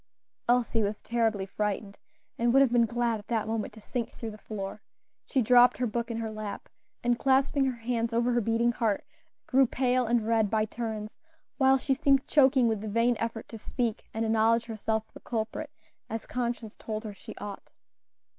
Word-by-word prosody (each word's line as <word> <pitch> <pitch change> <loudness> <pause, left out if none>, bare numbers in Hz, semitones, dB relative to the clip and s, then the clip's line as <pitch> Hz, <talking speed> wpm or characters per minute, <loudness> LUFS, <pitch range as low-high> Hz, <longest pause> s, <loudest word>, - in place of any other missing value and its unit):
Elsie 240 -2 +3
was 205 0 -1
terribly 225 -4 0
frightened, 205 0 -3 0.4
and 235 0 +3
would 270 +2 +6
have 260 - +2
been 235 -1 +4
glad 235 -1 0
at 205 - -15
that 225 -3 0
moment 220 -1 -2
to 220 - -12
sink 235 +2 -4
through 225 -2 -6
the 210 - -10
floor; 205 -1 -6 0.5
she 260 - +2
dropped 245 +1 +6
her 250 - 0
book 235 +1 -2
in 230 - -3
her 225 -1 -3
lap, 215 -2 -6 0.3
and 240 0 +2
clasping 270 +1 +3
her 260 -2 -1
hands 230 0 -1
over 235 +1 +2
her 240 0 +2
beating 230 +2 +2
heart, 225 -4 -1 0.4
grew 265 0 +4
pale 250 0 +1
and 235 -1 +2
red 220 -2 +2
by 215 0 +2
turns, 220 -1 -5 0.4
while 265 0 +5
she 270 +1 0
seemed 275 0 +3
choking 265 -4 +5
with 220 -3 0
the 220 - -5
vain 230 +3 +2
effort 230 -1 -3
to 225 - -9
speak 235 0 -3
and 225 +1 -1
acknowledge 225 +1 +3
herself 220 -1 -2
the - - -11
culprit, 230 +6 -3 0.4
as 225 0 -4
conscience 240 -3 -3
told 215 0 -5
her 215 -2 -6
she - - -11
ought. 205 -1 -8
230 Hz, 195 wpm, -29 LUFS, 220-245 Hz, 0.5 s, would